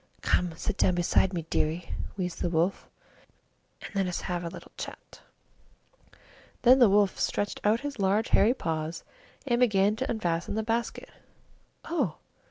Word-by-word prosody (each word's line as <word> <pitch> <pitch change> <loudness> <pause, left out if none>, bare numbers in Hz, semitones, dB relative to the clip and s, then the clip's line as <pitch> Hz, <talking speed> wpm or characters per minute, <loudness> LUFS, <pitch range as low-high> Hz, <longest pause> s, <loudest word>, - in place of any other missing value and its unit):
"Come 180 - +2
and 165 -2 -9
sit 210 - -3
down 185 - +3
beside 175 +2 +2
my 175 -3 -2
bed, 165 - -18
dearie," 160 +3 -1 0.3
wheezed 180 -2 -3
the - - +1
Wolf, 170 +3 0 0.9
"and - - -8
let 195 -2 0
us 180 - -3
have 175 -1 -3
a - - -3
little - - -11
chat." - - -9 1.4
Then 255 +2 +7
the 240 -4 +7
Wolf 200 -1 +3
stretched 205 - -1
out 215 +3 +3
his 285 -4 -5
large 200 +3 +2
hairy 230 +5 +4
paws 160 -5 -3 0.4
and 240 -3 +1
began 210 -4 +3
to 260 - -2
unfasten 175 -4 -1
the 220 - 0
basket. 230 +1 -2 0.7
"Oh!" 270 - -1
195 Hz, 165 wpm, -28 LUFS, 175-225 Hz, 1.4 s, Then